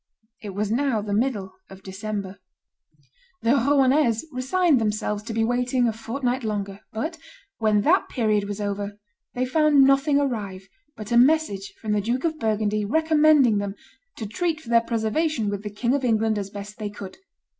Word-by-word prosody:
It 205 -4 -7
was 210 +1 -1
now 255 -1 +1
the 205 -1 -3
middle 205 -4 -1 0.2
of 195 0 -13
December. 200 0 -5 1.0
The 230 - +3
Rouennese 270 -2 +3
resigned 270 +2 +2
themselves 210 -1 -1
to 225 -1 -1
waiting 245 +1 +1
a 225 - 0
fortnight 245 +3 -3
longer; 200 -2 -3
but, 315 +9 -4 0.4
when 215 -2 +3
that 345 - +2
period 215 -5 +1
was 205 0 -5
over, 205 0 -3 0.4
they 250 +1 0
found 295 +1 +4
nothing 275 +2 +4
arrive 205 -8 -3 0.3
but 215 0 -8
a 235 - +4
message 250 -7 +2
from 215 - -4
the 210 -1 +2
Duke 240 +5 -1
of 320 -2 -1
Burgundy 215 -1 0
recommending 300 -3 +4
them 200 0 -4 0.4
"to 220 - -5
treat 315 - -2
for 275 - -13
their 230 -1 +5
preservation 230 +1 -1
with 200 -1 -4
the 210 - -5
King 235 +5 -1
of 280 -1 0
England 220 -2 +1
as 200 -1 -5
best 205 +2 -9
they 210 -1 -3
could." 200 -2 -9
225 Hz, 170 wpm, -24 LUFS, 205-270 Hz, 1.0 s, their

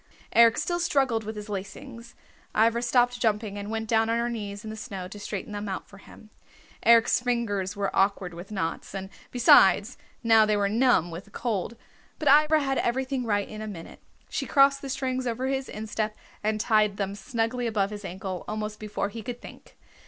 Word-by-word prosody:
Eric 230 0 +6
still 345 0 -1
struggled 270 -9 +1
with 215 +1 -6
his 210 0 -7
lacings. 230 +5 -8 0.4
Ivra 230 +2 +3
stopped 245 0 +2
jumping 210 -2 0
and 205 0 -6
went 225 0 -3
down 225 0 +2
on 230 - +1
her 235 +1 -1
knees 205 -3 -5
in 215 - -6
the - - -6
snow 200 -5 -6
to 205 +3 -10
straighten 205 0 -5
them 205 0 -4
out 190 - -5
for 200 - -15
him. 215 +2 -16 0.5
Eric's 230 -1 +5
fingers 225 -6 -1
were 200 -1 -2
awkward 195 -2 +1
with 175 +3 -9
knots, 190 -1 -4
and 190 0 -6 0.2
besides, 230 -1 +5 0.2
now, 225 -1 +6
they 215 -1 +2
were 200 -1 +2
numb 215 -6 +3
with 170 +4 -7
the - - -19
cold. 220 0 -3 0.4
But 300 - +1
Ivra 305 +2 +5
had 270 -1 0
everything 260 +1 -1
right 205 -2 +1
in 215 0 -8
a 215 - -5
minute. 175 -6 -9 0.3
She - - -3
crossed 275 -1 +4
the 275 - -6
strings 260 -1 -2
over 240 +2 -2
his 265 0 -2
instep 215 0 -3 0.3
and 215 0 0
tied 215 -2 +2
them 195 -1 -2
snugly 235 +3 -2
above 210 -3 0
his 210 0 -7
ankle 190 0 -5
almost 215 0 -4
before 210 -1 -3
he 225 +2 -7
could 240 +2 -6
think. - - -14
220 Hz, 195 wpm, -26 LUFS, 205-240 Hz, 0.5 s, Eric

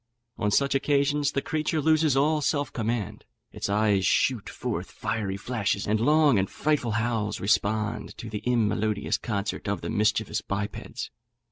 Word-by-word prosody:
On 105 - +1
such 140 +6 +2
occasions 145 +1 +1
the 140 - -1
creature 155 0 -1
loses 155 -2 +3
all 150 +2 +3
self 145 -2 0
command, 110 -2 -2 0.3
its - - -4
eyes 105 -2 +2
shoot 120 +2 +2
forth - - -4
fiery 105 -2 -3
flashes, 100 -2 -1
and 105 +1 +1
long 145 -1 +4
and 95 - 0
frightful 145 -7 0
howls 110 -2 -1
respond 105 +2 0
to 115 - -7
the 105 -1 -5
immelodious 110 -3 0
concert 100 -1 -3
of 100 -4 -1
the 85 - -4
mischievous 110 0 +1
bipeds. 100 +1 -5
110 Hz, 150 wpm, -26 LUFS, 105-140 Hz, 0.3 s, long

